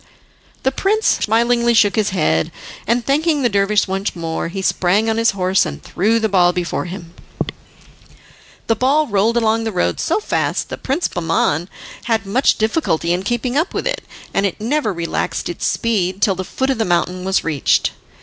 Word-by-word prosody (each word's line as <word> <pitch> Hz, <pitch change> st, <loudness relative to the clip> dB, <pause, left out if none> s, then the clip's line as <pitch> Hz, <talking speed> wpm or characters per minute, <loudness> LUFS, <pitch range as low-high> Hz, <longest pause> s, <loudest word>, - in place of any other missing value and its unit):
The 265 Hz, -, +2 dB
prince 420 Hz, +9 st, 0 dB
smilingly 235 Hz, +2 st, +2 dB
shook 205 Hz, -2 st, +4 dB
his 215 Hz, -2 st, +1 dB
head, 115 Hz, -, +1 dB, 0.4 s
and 235 Hz, +2 st, +1 dB
thanking 300 Hz, +1 st, +1 dB
the 240 Hz, -, +3 dB
dervish 200 Hz, 0 st, +2 dB
once 195 Hz, +1 st, -2 dB
more, 165 Hz, -1 st, -3 dB
he 190 Hz, +3 st, -5 dB
sprang 190 Hz, +5 st, +2 dB
on 225 Hz, 0 st, 0 dB
his 230 Hz, 0 st, +3 dB
horse 185 Hz, +1 st, +3 dB
and 70 Hz, -, -5 dB
threw 220 Hz, +5 st, +1 dB
the 220 Hz, -, +1 dB
ball 180 Hz, -3 st, +4 dB
before 175 Hz, -1 st, -2 dB
him. 175 Hz, -2 st, -8 dB, 1.5 s
The 225 Hz, -, +2 dB
ball 280 Hz, +6 st, +2 dB
rolled 220 Hz, 0 st, +1 dB
along 225 Hz, -1 st, +2 dB
the 225 Hz, -, -2 dB
road 180 Hz, -, 0 dB
so -, -, +1 dB
fast -, -, -1 dB
that -, -, -7 dB
Prince 280 Hz, +7 st, 0 dB
Bahman 165 Hz, 0 st, 0 dB, 0.4 s
had 225 Hz, -3 st, 0 dB
much 240 Hz, +8 st, +2 dB
difficulty 215 Hz, -, 0 dB
in 180 Hz, -, -1 dB
keeping 240 Hz, +4 st, -2 dB
up 320 Hz, +6 st, 0 dB
with -, -, -2 dB
it, -, -, -2 dB, 0.3 s
and -, -, +1 dB
it 185 Hz, -, -6 dB
never 235 Hz, +1 st, 0 dB
relaxed 170 Hz, -2 st, -3 dB
its 175 Hz, -, -2 dB
speed 195 Hz, -5 st, 0 dB
till 200 Hz, -1 st, +3 dB
the 185 Hz, 0 st, -4 dB
foot 265 Hz, +8 st, -1 dB
of 260 Hz, -, -2 dB
the -, -, +3 dB
mountain 180 Hz, 0 st, 0 dB
was 190 Hz, +1 st, +1 dB
reached. 150 Hz, -5 st, +1 dB
210 Hz, 185 wpm, -18 LUFS, 180-235 Hz, 1.5 s, shook